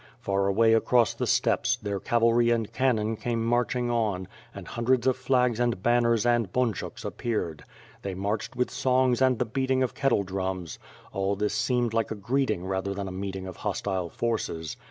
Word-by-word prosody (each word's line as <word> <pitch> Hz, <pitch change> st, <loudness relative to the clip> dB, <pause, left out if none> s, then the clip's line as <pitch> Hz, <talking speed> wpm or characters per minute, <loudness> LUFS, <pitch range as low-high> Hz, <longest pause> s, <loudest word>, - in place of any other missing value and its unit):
Far 100 Hz, 0 st, 0 dB
away 110 Hz, +3 st, +4 dB
across 115 Hz, +1 st, +3 dB
the -, -, -3 dB
steppes, -, -, +2 dB
their 100 Hz, -1 st, -3 dB
cavalry 120 Hz, +1 st, +3 dB
and 115 Hz, -3 st, 0 dB
cannon 115 Hz, -4 st, +1 dB
came 115 Hz, 0 st, -2 dB
marching 120 Hz, +1 st, +1 dB
on, 105 Hz, -6 st, -1 dB, 0.2 s
and -, -, -10 dB
hundreds 120 Hz, +1 st, +1 dB
of 130 Hz, -1 st, +3 dB
flags 125 Hz, -2 st, +1 dB
and 120 Hz, -6 st, 0 dB
banners 120 Hz, -1 st, +3 dB
and 120 Hz, -5 st, +2 dB
bunchuks 125 Hz, -6 st, -2 dB
appeared. 85 Hz, -10 st, -3 dB, 0.4 s
They 95 Hz, -2 st, -4 dB
marched 105 Hz, +6 st, -3 dB
with 125 Hz, 0 st, 0 dB
songs 130 Hz, -1 st, +2 dB
and 130 Hz, -2 st, +4 dB
the 125 Hz, -, 0 dB
beating 130 Hz, +2 st, 0 dB
of 130 Hz, -, -2 dB
kettle 135 Hz, -7 st, +1 dB
drums. 95 Hz, -3 st, -4 dB, 0.3 s
All 95 Hz, +1 st, 0 dB
this 105 Hz, +1 st, -1 dB
seemed 120 Hz, -3 st, 0 dB
more 115 Hz, -, +3 dB
like 115 Hz, -, -2 dB
a -, -, -3 dB
greeting 110 Hz, -3 st, -1 dB
than 95 Hz, +1 st, -2 dB
a -, -, -5 dB
meeting 95 Hz, 0 st, -5 dB
of 95 Hz, -2 st, -8 dB
hostile 95 Hz, -4 st, -2 dB
forces. 95 Hz, -9 st, -3 dB
115 Hz, 175 wpm, -27 LUFS, 100-120 Hz, 0.4 s, away